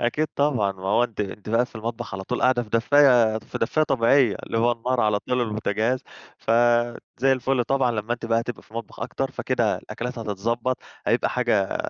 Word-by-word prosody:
أكيد 135 +6 0
طبعًا، 125 -9 +1
ما 95 -1 -15
هو 115 +4 +4
أنتِ 115 -3 -6
أنتِ 105 +1 -5
بقى 115 +3 +2
في - - -25
المطبخ 115 -1 -5
على 95 - -5
طول 125 - -3
قاعدة 130 -1 +3
في 115 - -12
دفّاية 120 -2 +4
دف 110 - -7
دفّاية 155 +7 +1
طبيعية 130 -3 +3
اللي 115 - -1
هو 120 +1 +3
النار 120 +2 -1
على 105 -2 +2
طول 125 - -1
والبوتاجاز، 110 +2 -1 0.4
ف - - -5 0.7
زي 135 +2 +4
الفُل 130 -1 0
طبعًا 135 0 +1
لمّا 110 +1 -2
أنتِ 120 -1 -4
بقى 115 0 +2
هتبقى 120 0 -6
في - - -26
المطبخ 115 0 -8
أكتر، - - -3
فكده - - 0
الأكلات 125 +1 -6
هتتضبّط، 115 +4 -2 0.3
هيبقى - - +2
حاجة 100 -2 +1
115 Hz, 195 wpm, -24 LUFS, 110-125 Hz, 0.7 s, هو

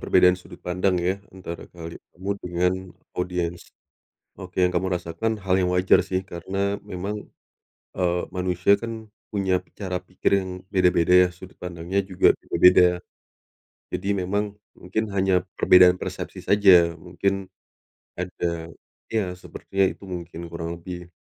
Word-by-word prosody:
perbedaan 90 0 +5
sudut 90 -1 -14
pandang 90 +1 0
ya, 90 +3 0 0.2
antara 85 -3 -7
kali 85 -1 -8 0.2
kamu 95 +4 -5
dengan 90 +1 +1 0.4
audiens. 90 -1 -3 0.6
Oke, 90 0 -5
yang 90 - +5
kamu 95 +1 0
rasakan 90 +6 -2
hal 95 0 +1
yang 90 -1 +1
wajar 90 +1 +4
sih, 95 0 -1
karena 95 +2 -3
memang, 100 +1 -4 0.8
eee, 90 -1 +1
manusia 90 +2 +2
kan 115 -2 -7 0.2
punya 95 -2 +2 0.2
cara 95 -3 -3
pikir 90 0 -2
yang 95 -1 -4 0.2
beda-beda 90 -1 +5
ya, - - -3
sudut 95 +1 -13
pandangnya 90 +2 -3
juga 95 -2 +4
beda-beda. 90 -1 +5 0.9
Jadi 100 - -3
memang, 100 +3 -1 0.2
mungkin 110 +5 -3
hanya 95 -2 +2
perbedaan 90 0 +7
persepsi - - -6
saja, 90 -5 +5
mungkin 95 +3 -2 0.7
ada 85 -2 -3 0.4
ya 95 -5 -1
sepertinya 95 +1 -2
itu 100 - -13
mungkin 85 -1 -6
kurang 85 0 -5
lebih. 90 0 -8
90 Hz, 135 wpm, -24 LUFS, 90-95 Hz, 0.9 s, perbedaan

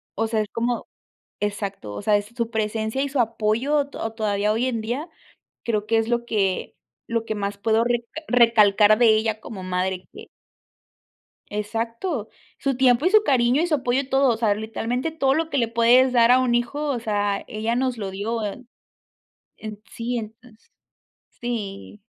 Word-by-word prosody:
o 225 +2 0
sea, 220 -1 0
es 210 - -5
como 235 +1 -2 0.5
exacto, 200 - -4
o 100 - -6
sea, 210 -1 +3
es 205 - -5
su 235 -2 -2
presencia 220 +3 -1
y 280 - -2
su 275 - -2
apoyo 230 +6 +1
to - - -7
o 225 - -3
todavía 210 -1 0
hoy 235 +3 0
en 230 -3 -2
día, 260 +9 -4 0.5
creo 215 -3 -1
que 225 - +2
es 225 +1 0
lo 235 0 0
que 195 -5 -1 0.3
lo 230 -1 0
que 220 -1 -3
más 200 0 -3
puedo 220 +2 +2
reca 240 -1 0 0.2
recalcar 215 -3 +5
de 240 - +6
ella 220 -1 0
como 195 -6 -8
madre, 185 0 -2
que - - -11 1.2
Exacto, 230 - -3 0.3
su 275 -1 -1
tiempo 255 +2 +3
y 360 - +5
su 430 +1 +5
cariño, 255 - +3
y 345 - +1
su 315 - +2
apoyo, 260 0 0
todo, 270 -2 +3
o 220 - -4
sea, 220 -3 +2
literalmente 225 +7 -3
todo 275 -4 +1
lo 320 +2 -1
que 285 - -1
le 235 -3 +1
puedes 240 +3 +5
dar 235 -1 +5
a 255 - +6
un 250 -2 +2
hijo, 285 +5 -1
o 255 -4 -1
sea, 205 -2 -1
ella 220 0 -2
nos 255 -1 0
lo 200 -3 -4
dio, 215 +4 -3
eh, 210 +5 -5 0.9
en 215 -1 -8
sí, 240 +1 -3
entonces 225 +1 -10 0.7
sí. 210 -4 -5
230 Hz, 185 wpm, -23 LUFS, 210-250 Hz, 1.2 s, de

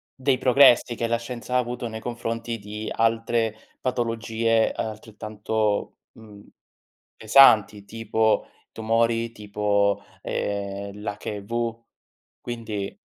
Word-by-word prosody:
dei 130 -1 +1
progressi 125 -2 +5
che 115 - -1
la 115 0 +1
scienza 120 +1 -6
ha - - +6
avuto 125 -1 -2
nei 110 0 -6
confronti 115 0 -4
di 105 +2 -6
altre 115 0 +1 0.3
patologie 115 -2 0
altrettanto, 110 -1 -3 0.2
mhmm, 105 -2 -14 0.7
pesanti 110 -4 +5
tipo 110 0 0 0.3
tumori, 115 +1 +1
tipo, 105 -1 0 0.2
ehm, 100 0 -3
l'HIV. 110 +3 -4 0.6
Quindi 110 -4 -5
115 Hz, 95 wpm, -24 LUFS, 105-115 Hz, 0.7 s, ha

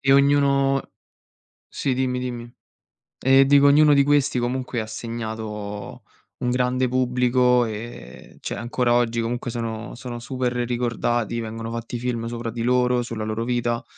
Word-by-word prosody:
E 135 0 +3
ognuno 140 -1 +3 0.8
sì 135 - -2
dimmi, 125 0 0
dimmi. 120 -1 -5 0.7
E 135 +1 +5
dico 140 0 +5
ognuno 150 +1 +6
di 140 - +5
questi 145 -2 +2
comunque 125 0 -2
ha - - -7
segnato 110 -2 -6 0.4
un 125 - -1
grande 125 +1 +1
pubblico, 125 0 +2
ehm, 110 - -8
cioè - - -4
ancora 120 0 0
oggi 120 -1 +2
comunque 120 +2 -3
sono 115 -1 -5
sono 120 0 -7
super 125 +1 -2
ricordati, 120 -1 -1
vengono 115 0 -5
fatti 115 +1 -5
film 115 -1 -2
sopra 115 0 -4
di 115 +1 -4
loro, 125 0 +2
sulla 115 -2 -4
loro 110 +1 -2
vita, 120 -1 -1
120 Hz, 145 wpm, -23 LUFS, 115-130 Hz, 0.8 s, ognuno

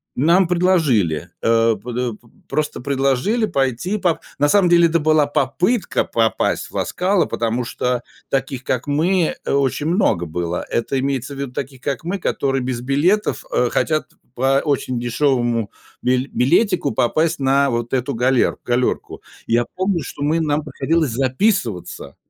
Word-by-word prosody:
Нам 170 +6 +4
предложили, 155 - +1
а 115 0 +3
под 125 +1 -7
э, 125 -2 -1
п 120 - -24 0.2
просто 150 -4 -2
предложили 140 - +1
пойти 135 - -1
поп 175 -4 +1 0.2
на 145 +1 +3
самом 200 0 +4
деле 170 -1 +6
это 165 +1 +1
была 155 -1 +3
попытка 180 - 0
попасть 115 -1 0
в - - -15
"Ла - - 0
Скала", 180 -3 +1
потому 115 +1 -1
что 125 +1 -1 0.3
таких, 135 -1 -2
как 130 +2 -2
мы, 165 +4 +1
э, - - -1
очень 140 +1 0
много 170 - +1
было. 85 +2 -3
Это 130 +3 0
имеется 135 0 -2
в - - -10
виду 140 -2 -4
таких, 130 0 -6
как 140 0 -3
мы, 180 +4 -2
которые 135 -7 -1
без 125 -1 -3
билетов, 170 - +1
э, - - +2
хотят 155 -1 0
п - - -29 0.2
по 135 +2 +2
очень 130 -4 -1
дешёвому 120 -3 0 0.3
бил 125 +1 +1
билетику 170 - +2
попасть 155 +9 +1
на 140 +1 +3
вот 120 0 -3
эту 130 +1 0
галер 125 +2 +2
галёрку. 125 +1 -1 0.2
Я 120 +1 +2
помню, 185 -2 0
что 145 - -6
мы 155 +3 +1
нам 150 -1 0
приходилось 160 -5 0
записываться, 130 - -1
135 Hz, 160 wpm, -20 LUFS, 125-165 Hz, 0.3 s, деле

